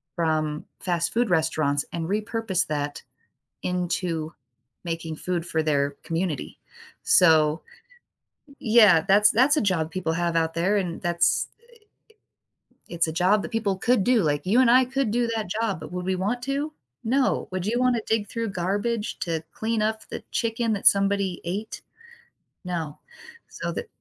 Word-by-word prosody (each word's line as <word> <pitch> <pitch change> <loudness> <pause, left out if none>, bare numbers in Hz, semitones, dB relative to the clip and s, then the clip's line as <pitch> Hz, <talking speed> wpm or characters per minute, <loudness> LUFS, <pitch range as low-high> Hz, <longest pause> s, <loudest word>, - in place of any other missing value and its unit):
from 155 -2 -1
fast 175 -2 -1
food 235 -2 +1
restaurants 155 -4 +1
and 165 -1 -3
repurpose 210 -2 -1
that 145 -1 -3 0.6
into 175 -3 -2 0.5
making 165 -2 -4
food 175 -2 -3
for 160 -2 -1
their 140 -2 +1
community. 165 -3 -3 0.4
So 160 -2 +4 1.0
Yeah, 215 -8 +6
that's 210 +2 +6
that's 270 +7 +4
a - - +3
job 175 -6 0
people 170 -3 -2
have 170 0 -1
out 165 0 +1
there, 190 +5 +2
and 175 -4 -3
that's, 175 -1 +1
i 470 - -31
i - - -28 1.3
it's 165 -1 +1
a - - -2
job 185 +5 +2
that - - -6
people 205 -4 -1
could 240 -4 +2
do, 245 -5 +3
like, 145 0 0
you 230 +7 +4
and 245 -2 +5
I 255 +1 +6
could 265 -3 -1
do 240 0 +1
that 215 -5 -3
job, 200 -8 -1
but 165 - -9
would 180 0 -4
we 190 - +1
want 220 +7 -2
to? 285 +3 -2 0.3
No. 260 +4 +1
Would 185 -1 -3
you 240 +3 0
wanna 250 -2 +2
dig 215 -2 0
through 230 -3 -3
garbage 205 +5 -2
to 165 -2 -2
clean 220 -1 -1
up 220 0 -1
the - - -6
chicken 230 0 0
that 200 - -4
somebody 195 -2 +3
ate? 200 +6 -4 0.8
No. 165 -5 -4 0.5
So - - -5
the 475 - -5
185 Hz, 160 wpm, -25 LUFS, 165-225 Hz, 1.3 s, Yeah